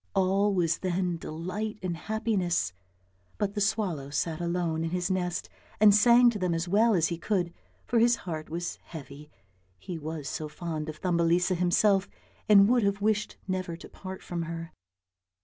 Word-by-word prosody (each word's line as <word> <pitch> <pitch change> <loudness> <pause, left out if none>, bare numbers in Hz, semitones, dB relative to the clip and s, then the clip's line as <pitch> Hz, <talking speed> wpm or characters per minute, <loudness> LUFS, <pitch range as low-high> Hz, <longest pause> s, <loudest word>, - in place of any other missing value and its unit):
All 195 +2 +3
was 170 -5 +1
then 180 -1 -1
delight 185 +8 -4
and 180 -2 -2
happiness, 190 - -1 0.6
but 205 -1 -1
the 205 - -2
swallow 195 -9 0
sat 160 +3 -2
alone 170 -2 -1
in 165 - -1
his 180 +2 -1
nest 180 -2 -1 0.3
and 210 -1 +7
sang 240 +3 +6
to 210 - -5
them 180 -2 0
as 165 +2 -2
well 215 +4 +4
as 165 -2 +2
he 170 -1 -4
could, 175 -3 -1 0.3
for 235 - +2
his 235 +1 +5
heart 155 -3 -5
was 170 +2 -4
heavy, 150 -1 -10 0.5
he 165 - -6
was 155 -1 -5
so 155 -2 -4
fond 160 -1 -5
of 155 - -7
Thumbelisa 175 +1 +2
himself, 190 +3 +2 0.4
and 200 -1 +8
would 245 +1 +4
have 200 -1 +1
wished 210 0 0
never 185 -3 -3
to - - -11
part 190 -1 -9
from 175 -1 -4
her. 165 0 -6
180 Hz, 170 wpm, -28 LUFS, 165-205 Hz, 0.6 s, and